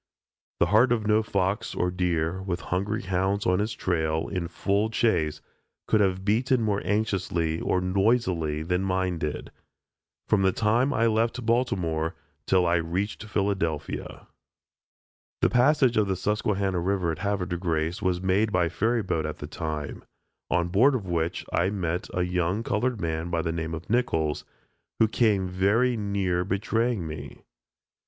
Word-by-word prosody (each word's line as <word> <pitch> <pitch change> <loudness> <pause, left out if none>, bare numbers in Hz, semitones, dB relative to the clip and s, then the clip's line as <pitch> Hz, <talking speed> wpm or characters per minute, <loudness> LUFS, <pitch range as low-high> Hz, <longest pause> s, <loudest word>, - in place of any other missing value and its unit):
The - - +5
heart 120 +4 +5
of 115 -3 +1
no 105 +1 +4
fox 100 -1 -1
or 90 0 0
deer, 90 0 -1
with 90 -2 -3
hungry 100 +4 -1
hounds 95 +2 0
on 90 +1 +2
his 105 +2 -1
trail, 80 -3 -1
in 90 -3 -2
full 100 +5 0
chase, 90 -10 +1 0.4
could 110 - +3
have 95 -1 0
beaten 120 +5 +2
more 105 -2 0
anxiously 95 -6 0
or 90 - +1
noisily 90 -5 +1
than 90 +3 0
did 95 - -2
mine, 95 -3 -1 1.1
from 105 - +3
the 95 0 +4
time 115 +7 +2
I 115 -3 +2
left 115 +2 +1
Baltimore 90 -9 0 0.3
till 90 -1 +3
I 85 0 +3
reached 90 +6 -2
Philadelphia. 95 -7 -2 1.2
The - - +3
passage 130 -1 +4
of 105 -2 +3
the 95 - 0
Susquehanna 100 -1 0
river 90 -1 0
at 80 - -5
Havre 100 -2 -1
de 90 0 -3
Grace 85 0 -1
was 90 -3 +1
made 95 +4 +1
by 90 -3 +2
ferry 115 +4 0
boat 85 -4 -1
at 75 - -5
that 75 - -8
time, 75 -3 -4 0.5
on 85 0 +1
board 125 +10 +4
of 110 -6 -3
which 85 -2 -2
I 90 +2 +2
met 90 -3 -2
a 90 -2 0
young 90 +4 0
colored 120 -1 -1
man 80 -1 -2
by 85 -1 -1
the 80 - -1
name 80 0 -3
of 80 - -9
Nichols, 90 -11 0 0.5
who 110 - +4
came 105 -4 +2
very 105 +7 +2
near 100 -4 0
betraying 105 +2 0
me. 75 0 -8
95 Hz, 160 wpm, -26 LUFS, 85-105 Hz, 1.2 s, The